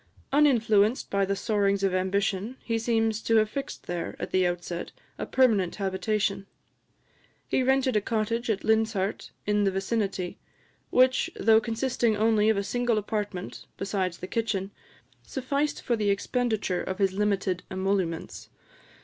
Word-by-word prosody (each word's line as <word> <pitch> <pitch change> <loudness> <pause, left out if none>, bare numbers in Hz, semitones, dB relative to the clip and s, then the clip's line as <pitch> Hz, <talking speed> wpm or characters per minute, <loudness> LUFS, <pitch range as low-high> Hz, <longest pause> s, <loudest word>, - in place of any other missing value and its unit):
Uninfluenced 230 -6 +3
by 200 0 +2
the 200 +1 -1
soarings 200 -1 +1
of 195 -2 +2
ambition, 195 +5 -1
he 230 -1 -1
seems 225 -1 +1
to 225 - +1
have 215 -1 +3
fixed 275 0 -5
here, 175 -1 -4
at - - -5
the 185 -1 +3
outset, 175 0 -4 0.3
a - - -3
permanent 220 -9 +3
habitation: 195 0 -1 1.0
he - - +1
rented 265 -1 +2
a 210 - +3
cottage 230 +2 -1
at 205 -3 0
Linshart 220 -3 0 0.2
in 210 0 +2
the 195 - +3
vicinity, 195 -1 -2 0.5
which, 255 0 +3
though 220 0 +4
consisting 235 -1 0
only 215 0 +3
of 220 - +3
a 200 - 0
single 240 +1 0
apartment, 205 -3 -4
besides 190 -3 -2
the - - -6
kitchen, 205 -2 -2 0.5
sufficed 280 +3 -2
for 240 - +1
the 210 -2 0
expenditure 215 -2 0
of 190 - -4
his 195 -2 +2
limited 195 -3 0
emoluments. 190 -3 -2
210 Hz, 145 wpm, -27 LUFS, 195-230 Hz, 1.0 s, though